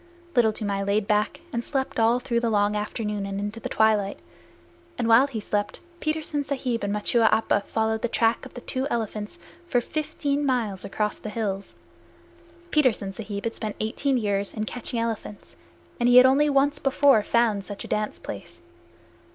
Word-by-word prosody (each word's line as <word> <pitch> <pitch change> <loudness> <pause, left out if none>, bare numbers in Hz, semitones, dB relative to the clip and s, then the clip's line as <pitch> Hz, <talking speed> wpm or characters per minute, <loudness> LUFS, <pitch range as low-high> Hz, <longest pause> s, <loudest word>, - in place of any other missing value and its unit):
Little 235 -3 +5
Toomai 205 -2 -2
lay 200 +1 +2
back 210 +7 0
and 235 0 -1
slept 265 -3 -2
all 230 +2 +4
through 240 -2 0
the 235 -1 0
long 205 -1 +2
afternoon 210 -1 -3
and 195 0 -3
into 205 +2 -4
the - - -5
twilight, 210 -2 +2 0.8
and 240 - 0
while 230 +4 +6
he 245 -6 -4
slept 205 0 -2 0.2
Petersen 310 -2 -1
Sahib 260 -5 -2
and 200 - -1
Machua 220 +2 +2
Appa 220 -2 +2
followed 220 0 0
the - - +1
track 230 0 +1
of - - -11
the 245 - -7
two 260 +3 -2
elephants 215 +1 -3 0.3
for 245 - +2
fifteen 295 +1 -2
miles 235 -8 0
across 210 +1 -2
the 215 - -6
hills. 205 -3 -3 1.0
Petersen 240 -10 +2
Sahib 205 -1 -5
had 230 - -2
spent 215 -2 -4
eighteen 255 +5 0
years 200 -3 -1
in 215 -1 -2
catching 240 +1 -4
elephants, 225 -2 -4 0.4
and 240 0 +3
he 245 - +7
had 250 - +10
only 280 +3 +4
once 285 +1 +2
before 275 -3 +4
found 220 -2 +1
such 200 0 -7
a - - -8
dance 210 0 -1
place. - - -8
225 Hz, 175 wpm, -25 LUFS, 210-255 Hz, 1.0 s, had